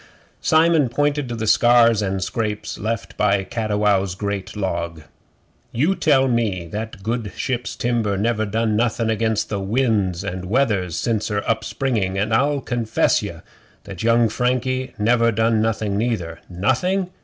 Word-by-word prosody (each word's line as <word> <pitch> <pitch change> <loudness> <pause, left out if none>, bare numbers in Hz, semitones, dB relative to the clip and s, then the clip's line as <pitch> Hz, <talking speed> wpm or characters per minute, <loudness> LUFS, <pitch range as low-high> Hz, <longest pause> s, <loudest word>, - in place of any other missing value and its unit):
Simon 160 -4 +3
pointed 145 +1 0
to 120 - -3
the 110 -1 -3
scars 115 -1 +5
and 95 -1 -1
scrapes 105 +1 -3
left 110 +1 -3
by 100 -2 +2
Cattiwow's 105 -3 0
great 100 0 -4
log. 85 -5 -3 0.7
'You 145 +10 +2
tell 150 -7 +3
me 115 -7 0
that 105 +6 -5
that 95 - -13
good 115 -1 -2
ship's 125 -2 -2
timber 115 -5 0
never 110 +1 0
done 110 +1 0
nothing 115 0 +1
against 110 -1 -1
winds 100 -3 0
and 95 -2 -5
weathers 100 - 0
since 110 +4 -1
her 105 -1 -2
up 110 0 0
springing, 110 -8 -1
and 105 +3 0
I'll 140 +4 +2
confess 120 -4 +1
ye - - -7 0.4
that 100 -3 -8
young 115 +1 +4
Frankie 130 +3 -1
never 115 +2 +3
done 110 0 +2
nothing 105 -2 -1
neither. 90 -8 -2
Nothing? 175 - 0
110 Hz, 150 wpm, -21 LUFS, 100-120 Hz, 0.7 s, scars